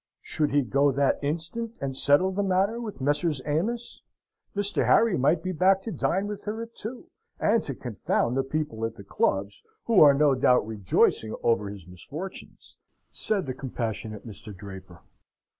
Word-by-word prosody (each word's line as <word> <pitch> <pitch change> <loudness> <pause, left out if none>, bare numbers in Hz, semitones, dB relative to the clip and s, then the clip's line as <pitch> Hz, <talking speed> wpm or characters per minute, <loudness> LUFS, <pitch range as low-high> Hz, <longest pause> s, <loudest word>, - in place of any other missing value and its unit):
Should 150 -2 -1
he 145 0 +2
go 140 +4 +2
that 140 +1 +1
instant 170 +11 -3
and 135 -1 -3
settle 145 +8 +4
the 195 +2 -1
matter 200 +4 +1
with 215 - -7
Messrs. 145 +2 +1
Amos? 215 +11 -2 0.5
Mr. 205 0 +1
Harry 225 -5 +4
might 155 +5 +2
be 185 - -2
back 190 +3 +3
to 225 - -4
dine 190 +3 0
with 205 0 -6
her 215 +2 -3
at 230 0 -11
two, 250 +11 -7 0.3
and 220 +1 +3
to 135 - -4
confound 120 0 -1
the 135 - +2
people 135 -5 -3
at 115 - -2
the 100 - -11
clubs, 100 +1 -1 0.2
"who 225 -5 +4
are 145 -2 +8
no 145 0 +4
doubt 125 -3 +3
rejoicing 110 +1 +1
over 105 -3 +2
his 100 -4 -9
misfortunes," 145 - -9 0.3
said 205 -3 -1
the 130 - -3
compassionate 110 -5 -5
Mr. 105 -2 -10
Draper. 95 -2 -11
145 Hz, 170 wpm, -26 LUFS, -, 0.5 s, are